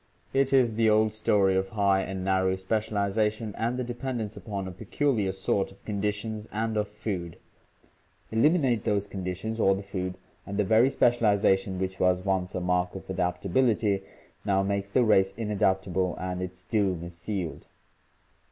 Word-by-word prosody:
It 135 0 +2
is 130 -4 +4
the 110 0 +3
old 110 0 +3
story 100 -3 +3
of 95 0 0
high 100 -2 +2
and 95 -1 -4
narrow 95 -1 +2
spe 95 +2 -12 0.2
cialization 105 +1 0
and 120 +2 -1
the 125 - -1
dependence 120 -3 -4
upon 100 -3 -5
a - - -5
peculiar 105 +1 0
sort 95 +1 -1
of 95 - -20
conditions 105 +1 -3
and 110 +1 -2
of 105 -1 0
food 95 -5 -5 0.5
— - - -37
eliminate 130 - +3
those 100 -3 +1
conditions 95 +3 -4
or 95 -2 +4
the 100 - -5
food 95 -2 -4 0.3
and 100 +1 -6
the 105 - +2
very 115 +6 +5
specialization 100 -6 +2
which 95 0 -3
was 90 0 +2
once 95 -2 0
a - - 0
mark 90 0 0
of 95 - -7
adaptability 100 +3 +1 0.4
now 95 -1 +2
makes 100 0 -1
the 125 +5 +3
race 95 -3 +4
inadaptable 95 -4 0
and 90 0 -3
its 90 0 -5
doom 95 -6 0
is 85 0 -7
sealed. 85 -1 -4
100 Hz, 165 wpm, -27 LUFS, 95-110 Hz, 0.5 s, very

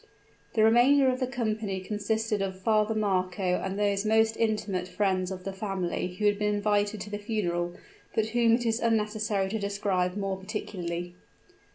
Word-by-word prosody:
The 220 - +4
remainder 255 +4 +5
of 255 - -3
the 255 - 0
company 220 -5 -2
consisted 210 +2 -1
of 190 -1 -3
Father 215 +2 +2
Marco 190 -2 0 0.2
and 190 +1 -3
those 200 -1 +1
most 220 +1 +3
intimate 210 -5 -1
friends 185 -2 0
of 185 -1 -6
the 195 - -4
family 190 -2 -3
who 210 - -2
had 205 0 +3
been 210 0 +1
invited 205 0 +1
to 210 - -7
the 205 - -3
funeral; 175 -5 -2 0.4
but 220 0 +1
whom 235 0 +3
it 240 0 -3
is 225 0 +1
unnecessary 215 -3 0
to 220 +2 -2
describe 200 -2 -1
more 195 -1 -2
particularly. 175 -3 -5
205 Hz, 170 wpm, -28 LUFS, 190-220 Hz, 0.4 s, remainder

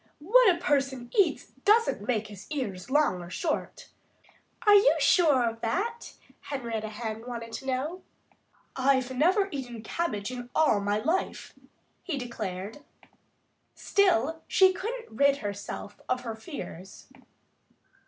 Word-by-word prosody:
"What 445 +9 +5
a 350 - +3
person 270 -7 -1
eats 400 - +2
doesn't 420 - +3
make 225 -3 0
his 205 -2 -11
ears 205 -12 -4
either - - -4
long 185 -12 +1
or 175 - -9
short." 310 - -3 0.8
"Are 415 - +7
you 410 +4 +6
sure 290 -9 +4
of 230 0 -4
that?" 450 - -2 0.3
Henrietta 230 -6 -4
Hen 220 +1 -6
wanted 230 -2 -6
to 265 - -7
know. 290 +8 -2 0.7
"I've 260 -1 +1
never 375 +9 +3
eaten 245 -6 -6
cabbage 220 -6 -2
in 245 -1 -7
all 310 -10 +4
my 205 +1 0
life," 320 - -2 0.5
he 320 -6 -3
declared. 215 -3 -5 1.0
Still 325 - +2
she 380 -1 +5
couldn't 450 - -6
rid 280 +3 +4
herself 205 -2 -6
of 255 0 0
her 235 -2 -5
fears. 220 - -9
260 Hz, 135 wpm, -28 LUFS, 220-340 Hz, 1.0 s, Are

